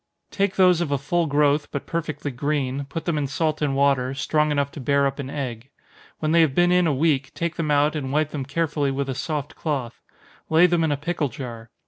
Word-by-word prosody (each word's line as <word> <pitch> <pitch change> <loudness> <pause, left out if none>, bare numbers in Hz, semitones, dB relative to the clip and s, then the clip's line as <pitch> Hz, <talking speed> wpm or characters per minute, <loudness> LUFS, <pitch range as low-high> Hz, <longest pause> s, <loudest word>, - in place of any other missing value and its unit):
_ - - -47
Take 200 -1 0
those 180 -2 +5
of 170 - -1
a 140 - +1
full 165 +5 0
growth, 145 +1 +2
but 140 - -5
perfectly 155 -4 -3
green, 140 0 -2
put 155 +4 -6
them 165 -4 0
in 140 - -1
salt 155 +2 -1
and 140 -2 0
water, 135 -2 +2
strong 150 +2 +1
enough 140 -1 0
to - - -9
bear 140 +1 +2
up 140 +1 -2
an 135 -2 -4
egg. 130 -3 -5 0.5
When 155 0 -1
they 170 0 +5
have 150 -5 +2
been 175 0 +4
in 180 -1 +4
a - - +2
week, 140 -1 +1
take 170 -1 -2
them 160 -2 -2
out, 150 +1 +3
and 135 -3 -3
wipe 150 +1 +1
them 145 -3 -3
carefully 145 0 -1
with 135 0 -2
a - - -1
soft 145 +2 -4
cloth. 135 -7 -3 0.5
Lay 160 +2 +6
them 175 -2 +2
in 160 - +1
a 145 - 0
pickle 155 -1 -2
jar. 120 -5 -8
145 Hz, 235 wpm, -23 LUFS, 140-160 Hz, 0.5 s, Lay